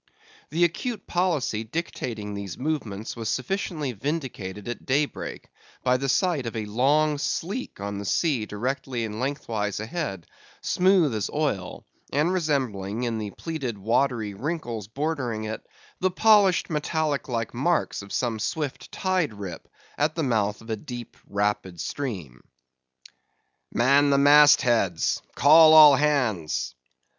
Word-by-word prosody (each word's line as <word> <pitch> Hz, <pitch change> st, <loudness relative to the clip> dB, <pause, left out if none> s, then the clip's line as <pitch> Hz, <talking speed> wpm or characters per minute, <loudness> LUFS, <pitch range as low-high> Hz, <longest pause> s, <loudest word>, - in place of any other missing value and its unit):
The 170 Hz, -, +1 dB
acute 200 Hz, +5 st, -1 dB
policy 160 Hz, -11 st, 0 dB
dictating 115 Hz, -6 st, -4 dB
these 100 Hz, -4 st, -6 dB
movements 120 Hz, -8 st, -3 dB
was 115 Hz, -2 st, -4 dB
sufficiently 155 Hz, -2 st, -2 dB
vindicated 115 Hz, -, -4 dB
at 120 Hz, -, -5 dB
daybreak, 145 Hz, +3 st, -1 dB, 0.4 s
by 125 Hz, 0 st, +3 dB
the 135 Hz, +1 st, -2 dB
sight 155 Hz, -4 st, +1 dB
of 115 Hz, -, -5 dB
a 110 Hz, -1 st, -2 dB
long 145 Hz, +7 st, +2 dB
sleek 195 Hz, -, -3 dB
on 100 Hz, 0 st, -4 dB
the 100 Hz, -, -6 dB
sea 130 Hz, -, +1 dB
directly 125 Hz, +2 st, -3 dB
and 110 Hz, 0 st, -6 dB
lengthwise 115 Hz, -7 st, -2 dB
ahead, 110 Hz, -, -4 dB, 0.3 s
smooth 180 Hz, -7 st, +3 dB
as 105 Hz, -2 st, -2 dB
oil, 140 Hz, -12 st, -2 dB, 0.3 s
and 150 Hz, +6 st, +1 dB
resembling 125 Hz, -, -1 dB
in 115 Hz, -2 st, -1 dB
the 105 Hz, -1 st, -4 dB
pleated 135 Hz, -3 st, -5 dB
watery 115 Hz, 0 st, 0 dB
wrinkles 120 Hz, -, -4 dB
bordering 130 Hz, -4 st, -2 dB
it, 110 Hz, 0 st, -5 dB, 0.4 s
the 185 Hz, -, +2 dB
polished 200 Hz, -1 st, +4 dB
metallic 150 Hz, -2 st, -1 dB
like 115 Hz, -2 st, -2 dB
marks 160 Hz, +3 st, 0 dB
of 100 Hz, 0 st, -12 dB
some 115 Hz, -3 st, -1 dB
swift 145 Hz, +5 st, -3 dB
tide 185 Hz, -, 0 dB
rip, 95 Hz, -5 st, -7 dB, 0.3 s
at 150 Hz, +2 st, +1 dB
the 165 Hz, -, -1 dB
mouth 110 Hz, -5 st, 0 dB
of 115 Hz, 0 st, -8 dB
a -, -, +1 dB
deep, 120 Hz, 0 st, -8 dB
rapid 100 Hz, -3 st, -1 dB
stream. 90 Hz, -, -5 dB, 1.3 s
"Man 140 Hz, +4 st, +4 dB
the 140 Hz, -, +4 dB
mast 145 Hz, 0 st, +7 dB
heads! 105 Hz, -, +1 dB
Call 155 Hz, +3 st, +7 dB
all 150 Hz, -2 st, +10 dB
hands!" 125 Hz, -, 0 dB
130 Hz, 135 wpm, -25 LUFS, 105-155 Hz, 1.3 s, all